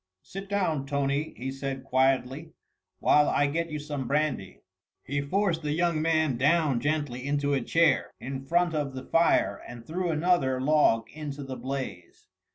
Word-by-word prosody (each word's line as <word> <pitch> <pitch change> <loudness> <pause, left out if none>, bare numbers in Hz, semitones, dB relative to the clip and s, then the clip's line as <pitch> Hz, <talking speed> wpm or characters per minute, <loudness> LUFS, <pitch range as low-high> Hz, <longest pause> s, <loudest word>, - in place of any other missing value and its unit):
"Sit 195 +1 -8
down, 165 -9 0
Tony," 140 +2 -1
he 130 +2 -4
said 135 -1 -5
quietly, 135 +3 0 0.4
"while 150 0 +4
I 145 - +2
get 165 +4 -1
you 155 - -4
some 145 -3 -5
brandy." 140 -8 -1 0.4
He 140 +2 -2
forced 175 +3 0
the 150 -1 -1
young 170 -1 +1
man 160 -5 +1
down 145 -1 +2
gently 145 -3 -2
into 145 +1 0
a 135 - +1
chair 165 +2 +2
in 135 +1 -5
front 170 +4 +1
of 145 -3 -2
the 130 - -7
fire 165 +1 +2
and 120 -1 -10
threw 175 +4 -2
another 155 -5 +2
log 130 -5 +3
into 145 -2 -6
the 135 -1 -6
blaze. 130 -8 -6
145 Hz, 165 wpm, -27 LUFS, 135-160 Hz, 0.4 s, while